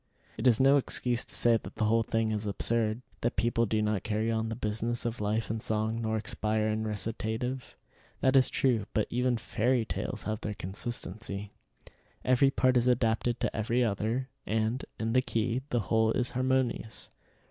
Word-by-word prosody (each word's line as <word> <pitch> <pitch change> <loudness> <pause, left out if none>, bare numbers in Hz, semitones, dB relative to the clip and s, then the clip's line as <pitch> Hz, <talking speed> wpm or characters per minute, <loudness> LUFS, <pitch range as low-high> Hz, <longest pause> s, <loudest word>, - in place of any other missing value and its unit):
It - - 0
is 120 -3 +5
no 135 +2 +6
excuse 125 -2 +1
to - - -4
say 115 -1 +4
that - - -10
the 110 - 0
whole 115 +2 +3
thing 115 0 0
is 105 -1 -2
absurd; 115 +3 0 0.2
that 120 - 0
people 115 +2 +1
do 110 +1 +1
not 105 -3 0
carry 110 +2 -1
on 110 0 -1
the 115 - -3
business 115 +2 -2
of 120 -1 -3
life 105 +2 0
in 110 - -2
song, 110 +1 -1
nor 110 -1 0
expire 110 0 0
in 110 0 -1
recitative. 110 +4 -3 0.4
That 130 0 +3
is 130 -1 +5
true, 115 -6 +1
but 105 - +2
even 125 0 +1
fairy 120 +2 0
tales - - -3
have 110 0 -3
their 105 -1 -3
consistency. 100 0 -5 0.7
Every 130 +2 +5
part 130 -2 +3
is 120 0 +2
adapted 120 -1 +1
to - - -1
every 115 +3 +1
other, 115 +4 -1 0.2
and, 110 +4 0 0.2
in 115 +1 -1
the 130 - +5
key, 115 +1 -1
the 120 - +1
whole 110 +3 +2
is 125 -1 0
harmonious. 130 -3 -1
115 Hz, 180 wpm, -30 LUFS, 110-125 Hz, 0.7 s, no